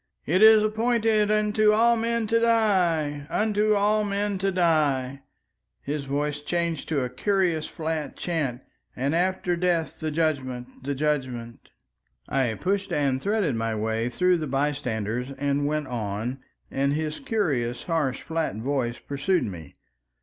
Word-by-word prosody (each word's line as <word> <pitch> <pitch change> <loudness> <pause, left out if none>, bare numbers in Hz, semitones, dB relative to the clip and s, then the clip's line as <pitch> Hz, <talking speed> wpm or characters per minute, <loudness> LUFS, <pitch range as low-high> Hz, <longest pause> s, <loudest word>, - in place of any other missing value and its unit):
It 185 +6 +2
is 220 -1 +8
appointed 220 -1 +2
unto 215 0 +3
all 235 +2 +4
men 230 0 0
to 230 +2 +2
die—unto 205 -1 +2
all 210 +1 +2
men 200 -1 -1
to 195 +1 0
die"—his 140 - -2
voice 145 +1 -2
changed 170 +1 -2
to 150 -4 +1
a 125 - -2
curious 180 0 0
flat 160 -2 -4
chant—"and 140 -3 -3
after 180 +1 +1
death, 170 -2 0
the 155 - -2
Judgment! 135 -6 -2
The 140 +2 -3
Judgment!" 130 -5 -3 0.6
I 135 -4 +1
pushed 195 +2 -1
and 135 -3 +1
threaded 200 - +1
my 115 -1 -1
way 110 +2 -1
through 180 +6 +2
the 155 - -3
bystanders 130 -3 -2
and 140 +1 0
went 150 0 -1
on, 115 +1 -3 0.3
and 140 +1 +1
his 155 0 -2
curious 145 - -1
harsh 155 -7 -1
flat 160 -8 -2
voice 120 0 -2
pursued 145 +6 -1
me. 85 -8 -7
155 Hz, 135 wpm, -25 LUFS, 130-195 Hz, 0.6 s, is